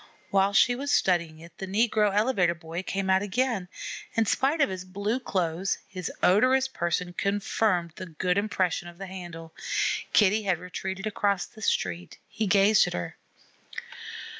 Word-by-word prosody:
While 195 0 +3
she 245 +5 +5
was 280 +3 -3
studying 170 -4 +2
it, 170 +1 -14
the 190 - -4
negro 210 +1 +2
elevator 200 -5 +2
boy 165 +1 -6
came 195 0 -3
out 190 0 +4
again. 205 -1 -1 0.5
In 225 - +3
spite 280 +8 +1
of 280 - +4
his 185 -1 -5
blue 200 +6 -2
clothes, 185 -5 -1
his 185 -2 -5
odorous 255 +8 +4
person 175 -5 -2
confirmed 200 -3 0
the 185 - -6
good 180 +2 -1
impression 185 -4 -1
of 175 0 -11
the 195 - -6
handle. 175 -3 -9 0.6
Kitty 210 +1 +4
had 190 -4 +1
retreated 190 +3 -5
across 200 -3 0
the 220 - -15
street. 90 - -1
He 220 - -2
gazed 200 +2 +5
at - - -4
her. 90 -1 -5
190 Hz, 160 wpm, -27 LUFS, 175-215 Hz, 0.6 s, she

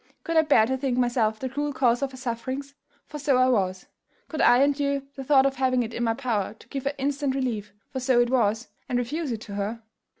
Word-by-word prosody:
could 330 - -3
I 320 - +7
bear 285 -8 +4
to 265 +3 -1
think 260 -2 -1
myself 240 -3 +1
the 260 - -3
cruel 290 +3 -3
cause 245 -2 +2
of 275 - 0
her 260 - -12
sufferings? 260 +3 -4 0.3
for 300 - -8
so 280 -2 +2
I 255 0 +4
was: 190 -6 0 0.4
could 310 - -2
I 245 +3 +6
endure 280 -1 +1
the 270 - -7
thought 270 0 +5
of 275 -1 0
having 255 -1 +2
it 230 0 -6
in 240 - -2
my 225 -1 +1
power 220 -6 -2
to - - -19
give 275 -1 -5
her 280 - 0
instant 280 0 -1
relief, 225 -6 -2 0.2
for 260 - -3
so 255 -1 +3
it 240 0 +2
was, 225 -2 +1 0.2
and 250 - +1
refuse 290 +4 -2
it 225 -1 -4
her? 205 +2 -4
255 Hz, 235 wpm, -26 LUFS, 235-275 Hz, 0.4 s, I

